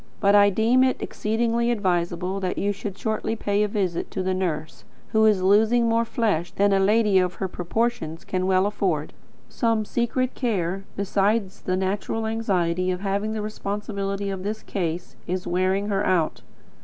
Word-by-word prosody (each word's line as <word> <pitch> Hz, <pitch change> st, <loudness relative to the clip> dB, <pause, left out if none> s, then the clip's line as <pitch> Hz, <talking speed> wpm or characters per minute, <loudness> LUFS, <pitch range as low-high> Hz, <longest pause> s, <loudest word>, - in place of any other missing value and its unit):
But 200 Hz, -1 st, +4 dB
I 205 Hz, 0 st, +7 dB
deem 225 Hz, +6 st, +3 dB
it 260 Hz, -1 st, +1 dB
exceedingly 235 Hz, +2 st, 0 dB
advisable 180 Hz, -3 st, 0 dB
that 185 Hz, -2 st, -2 dB
you 205 Hz, -, +1 dB
should 200 Hz, -1 st, -6 dB
shortly 220 Hz, +1 st, -2 dB
pay 205 Hz, -2 st, 0 dB
a 210 Hz, -, +3 dB
visit 190 Hz, -5 st, -2 dB
to 190 Hz, -, -3 dB
the 185 Hz, 0 st, 0 dB
nurse, 160 Hz, -4 st, -3 dB, 0.3 s
who 220 Hz, -1 st, +4 dB
is 200 Hz, -4 st, +3 dB
losing 220 Hz, +5 st, +4 dB
more 230 Hz, 0 st, +2 dB
flesh 205 Hz, -8 st, 0 dB
than 200 Hz, 0 st, +2 dB
a 195 Hz, -, +3 dB
lady 205 Hz, 0 st, +4 dB
of 180 Hz, -1 st, 0 dB
her 190 Hz, -, -2 dB
proportions 180 Hz, -2 st, -2 dB
can 185 Hz, 0 st, -1 dB
well 190 Hz, 0 st, +3 dB
afford. 185 Hz, -7 st, -1 dB, 0.3 s
Some 225 Hz, -2 st, 0 dB
secret 245 Hz, +3 st, -1 dB
care, 195 Hz, -6 st, -1 dB
besides 200 Hz, +1 st, 0 dB
the 185 Hz, 0 st, -1 dB
natural 200 Hz, +4 st, -2 dB
anxiety 185 Hz, -5 st, 0 dB
of 180 Hz, 0 st, -2 dB
having 200 Hz, +2 st, -1 dB
the 215 Hz, -1 st, -3 dB
responsibility 200 Hz, -1 st, -3 dB
of 190 Hz, -1 st, -4 dB
this 215 Hz, +3 st, -4 dB
case, 175 Hz, -3 st, -4 dB
is 180 Hz, +1 st, -2 dB
wearing 185 Hz, +3 st, 0 dB
her 200 Hz, -1 st, +1 dB
out. 175 Hz, -4 st, +1 dB
200 Hz, 170 wpm, -24 LUFS, 185-220 Hz, 0.3 s, I